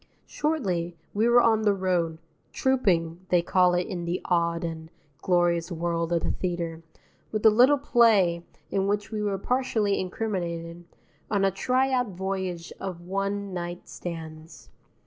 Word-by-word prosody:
Shortly, 185 - -2 0.2
we 215 +3 +2
were 240 0 +6
on 220 -1 +4
the 205 -2 +3
road 175 -4 0 0.3
"trouping," 180 -10 +1
they 175 -1 +3
call 180 0 +3
it 175 0 0
in 175 -2 -5
the 175 +2 -1
odd 170 -2 +1
and 160 -1 -5 0.3
glorious 175 -1 +1
world 170 0 -2
of 170 -1 +1
the - - 0
theatre 170 -3 -3 0.5
with 215 0 -2
a 220 - +9
little 255 +7 +5
play 210 -10 +3 0.3
in 195 0 +1
which 205 +1 -1
we 215 -1 -2
were 205 -2 0
partially 220 -2 0
incriminated, 175 -4 -4 0.4
on 200 -2 +2
a 195 - +3
try 255 +7 +1
out 250 -2 +1
voyage 185 -2 -4
of 180 -3 -5
one 195 +2 -3
night 175 0 -5
stands. 160 -2 -8
185 Hz, 150 wpm, -26 LUFS, 170-210 Hz, 0.5 s, a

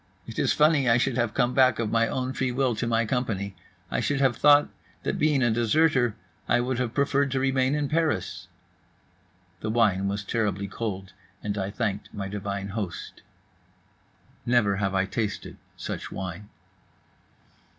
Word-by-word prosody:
It 115 - -6
is - - +2
funny 150 -4 +4
I 115 - +5
should 125 0 +1
have 120 -3 0
come 125 +1 +2
back, 130 -4 +4
of 115 -2 -2
my 115 0 +3
own 130 +1 -2
free 130 -1 -1
will, 130 0 +1
to 120 - -1
my 115 0 +2
company. 105 -5 -2 0.4
I - - 0
should 145 -1 0
have 135 -3 +3
thought 145 +2 +5 0.3
that - - -2
being 150 -3 +3
a 120 - +3
deserter 120 +1 +2 0.3
I 120 - +4
would 125 +1 -1
have 125 -2 -2
preferred 140 0 +2
to 135 0 0
remain 130 +1 +2
in 150 -1 0
Paris." 155 - -1 1.1
The 110 - -3
wine 105 -4 +2
was 100 +1 -2
terribly 100 -2 -1
cold, 95 -2 -5 0.3
and 105 -1 -2
I 95 -1 -2
thanked 105 -2 -3
my 100 -1 -3
divine 100 0 -4
host. 100 -4 -5 1.2
Never 110 -5 +2
have 95 -1 -1
I 95 0 +2
tasted 105 +2 -4 0.2
such - - -5
wine. 95 +2 -6
115 Hz, 165 wpm, -26 LUFS, 100-130 Hz, 1.2 s, I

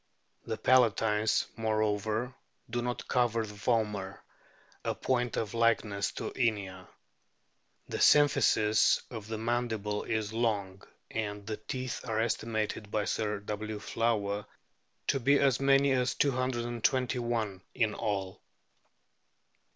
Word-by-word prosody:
O - - -23
The 110 - -1
palatines, 110 -3 +3
moreover, 110 +2 0 0.4
do 120 0 -1
not 120 0 -4
cover 115 -3 +1
the 105 - -9
vomer, 105 -3 -1 0.7
a - - -1
point 120 -2 0
of 110 -1 -2
likeness 115 -3 +1
to - - -4
Inia. 100 -6 -1 1.0
The - - -4
symphysis 110 -7 +4
of 110 -3 -7
the 110 0 -3
mandible 110 -3 -1
is 110 -1 -2
long, 105 -5 -1 0.3
and 105 -2 -3
the 110 0 -4
teeth 130 +3 -4
are 110 -1 0
estimated 110 -2 -1
by 105 -1 0
Sir 105 -2 -1
W. 105 +1 -4
Flower 105 -2 -1 0.6
to 135 - +1
be 140 +3 +4
as 135 -4 +3
many 135 0 +4
as 125 -1 +1
221 120 -4 0
in 110 -3 +1
all. 100 -4 -3
110 Hz, 120 wpm, -30 LUFS, 105-120 Hz, 1.0 s, symphysis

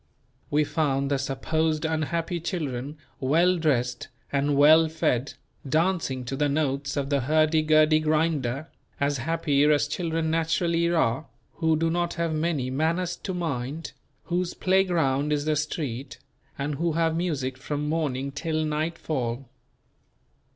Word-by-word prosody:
We 150 +1 +3
found 145 -2 0
the 140 - +1
supposed 155 +4 -1
unhappy 160 +2 -1
children, 150 -5 -4 0.2
well 170 +7 +3
dressed 125 -6 0 0.2
and 140 0 +1
well 155 +3 +7
fed, 140 -4 -1 0.3
dancing 160 -5 0
to 135 - -3
the 145 +1 +1
notes 140 -1 -1
of 140 0 -2
the 140 - +3
hurdy 155 +4 +3
gurdy 155 0 +4
grinder, 155 -3 0 0.3
as 140 -1 0
happy 150 0 +1
as 150 -1 +3
children 165 0 -1
naturally 165 +1 +1
are, 145 -4 +1 0.3
who 160 -2 +2
do 165 +1 +1
not 175 0 -1
have 170 -1 -1
many 155 -5 -1
"manners 165 +5 0
to 190 - -5
mind," 155 -2 -3 0.3
whose 175 0 -2
playground 165 -7 +2
is 145 -1 0
the 155 0 +1
street, 145 -4 -3 0.4
and 145 +2 -2
who 170 -1 +1
have 165 0 +1
music 145 -7 -1
from 145 +2 -4
morning 140 -4 -1
till 155 +2 -2
nightfall. 150 -5 -2
155 Hz, 135 wpm, -26 LUFS, 140-165 Hz, 0.4 s, well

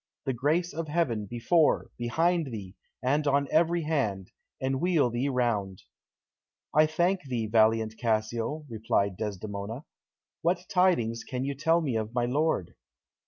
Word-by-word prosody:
The 135 - 0
grace 155 +8 0
of 165 +1 -4
heaven, 140 -10 0
before, 150 - +2
behind 165 +7 +1
thee, 100 -7 -7 0.3
and 145 +4 +1
on 140 0 +2
every 170 +1 +3
hand, 110 - -1 0.3
enwheel 135 +1 +1
thee 125 +4 -1
round!" 110 -7 -1 0.9
"I 155 +1 +5
thank 175 +4 +1
thee, 120 -4 -2
valiant 110 0 +2
Cassio," 115 +6 -1
replied 110 -4 0
Desdemona. 105 +5 -5 0.6
"What 175 +2 0
tidings 165 - +2
can 130 0 -4
you 140 +1 -2
tell 165 +5 +2
me 135 -7 -1
of 110 +2 -4
my 120 -1 +2
lord?" 135 - 0
130 Hz, 135 wpm, -28 LUFS, 110-155 Hz, 0.9 s, I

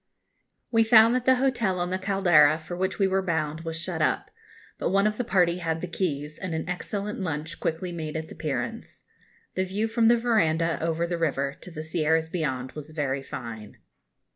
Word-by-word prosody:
] - - -42
We 225 -1 +5
found 225 0 +7
that 250 -1 0
the 260 - +6
hotel 245 -7 +1
on 175 +1 -1
the 185 - -1
Caldera 175 -6 +4
for 165 +2 -7
which 190 +1 -1
we 195 - +3
were 190 0 +2
bound 160 -3 -1
was 165 0 -4
shut 170 - -3
up; - - 0 0.5
but - - 0
one 195 +2 +3
of 210 0 +1
the - - +1
party 180 -5 +2
had 165 -2 -1
the 180 - -4
keys, 155 -4 -3
and 185 -4 -3
an 160 - -3
excellent 200 +3 -4
lunch 160 -3 -4
quickly 165 +3 -2
made 160 -2 -5
its 160 0 -4
appearance. 165 +9 -4 0.5
The 185 - 0
view 200 +4 -1
from 225 0 +2
the 240 +1 +6
verandah, 170 -9 +1
over 165 +1 0
the 170 0 -3
river, 140 -4 0
to - - -9
the 155 -2 -6
Sierras 160 0 +1
beyond, 130 -7 -2
was 150 0 -9
very 140 -3 -2
fine. 110 -5 -8
170 Hz, 200 wpm, -26 LUFS, 155-195 Hz, 0.5 s, found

